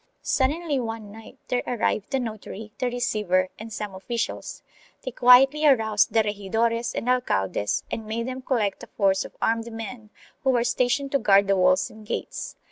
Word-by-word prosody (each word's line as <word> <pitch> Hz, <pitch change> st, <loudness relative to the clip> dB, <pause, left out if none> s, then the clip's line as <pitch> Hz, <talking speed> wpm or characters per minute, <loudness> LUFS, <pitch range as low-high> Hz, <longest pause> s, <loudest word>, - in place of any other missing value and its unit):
Suddenly 290 Hz, +2 st, 0 dB
one 225 Hz, -3 st, -5 dB
night 225 Hz, +1 st, -13 dB
there 250 Hz, 0 st, +1 dB
arrived 215 Hz, -3 st, -1 dB
the 270 Hz, -1 st, 0 dB
notary, 220 Hz, -2 st, -6 dB
the 250 Hz, -, 0 dB
receiver 210 Hz, -7 st, 0 dB
and 220 Hz, +1 st, -8 dB
some 210 Hz, -2 st, -5 dB
officials; 230 Hz, +5 st, -4 dB, 0.4 s
they 255 Hz, -, -4 dB
quietly 265 Hz, +5 st, +6 dB
aroused 220 Hz, -8 st, +4 dB
the 225 Hz, -, +3 dB
regidores 225 Hz, +3 st, -1 dB
and -, -, -3 dB
alcaldes 105 Hz, -, 0 dB
and 220 Hz, -1 st, -4 dB
made 230 Hz, +2 st, -3 dB
them 260 Hz, 0 st, -5 dB
collect 230 Hz, -6 st, -1 dB
a -, -, -9 dB
force 195 Hz, -1 st, +1 dB
of -, -, -13 dB
armed 230 Hz, +1 st, 0 dB
men 225 Hz, 0 st, -7 dB, 0.3 s
who 265 Hz, -, +2 dB
were 245 Hz, -2 st, +3 dB
stationed 250 Hz, +3 st, 0 dB
to 275 Hz, -, +2 dB
guard 200 Hz, -3 st, +5 dB
the 195 Hz, 0 st, +2 dB
walls 185 Hz, 0 st, +3 dB
and 215 Hz, -1 st, -14 dB
gates. -, -, -4 dB
225 Hz, 175 wpm, -25 LUFS, 210-250 Hz, 0.4 s, quietly